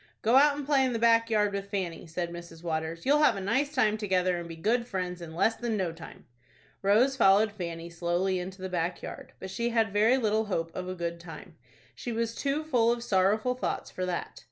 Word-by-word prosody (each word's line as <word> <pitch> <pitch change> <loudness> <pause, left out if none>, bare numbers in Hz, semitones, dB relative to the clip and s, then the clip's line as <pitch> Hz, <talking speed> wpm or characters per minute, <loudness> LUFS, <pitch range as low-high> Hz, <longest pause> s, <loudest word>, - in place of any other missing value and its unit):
"Go 230 +3 +3
out 290 +1 +5
and 290 - -4
play 280 -2 +3
in 255 -2 0
the - - 0
back 230 0 +4
yard 210 -2 +2
with 200 0 -4
Fanny," 185 -4 -4
said 170 +1 -4
Mrs. 170 -1 -10
Waters. 160 0 -3
"You'll 290 +3 +4
have 300 - +5
a - - -4
nice 265 +9 0
time 220 -7 +2
together, 185 -3 +1
and 170 0 -7
be 165 - -7
good 230 +8 0
friends 180 -4 -4
in 160 -1 -8
less 220 +6 +3
than 235 -2 -2
no 185 -4 -1
time." 165 0 -12 0.6
Rose 225 +8 +3
followed 205 -2 +5
Fanny 170 -4 -6
slowly 175 +2 -1
into 185 +1 -7
the - - -2
back 175 -1 -2
yard; 265 -1 -8
but 190 - -7
she 235 +5 -1
had 225 -3 +1
very 220 +5 +4
little 220 -2 +1
hope 165 -5 -3
of 185 0 -4
a 185 - -4
good 170 -1 -4
time. 165 -1 -11 0.4
She 240 - -6
was 230 0 -1
too 280 +5 -1
full 245 -7 +2
of 235 0 -2
sorrowful 215 +3 +2
thoughts 250 - -3
for 185 0 -3
that. 175 -1 -4
200 Hz, 225 wpm, -28 LUFS, 175-235 Hz, 0.6 s, out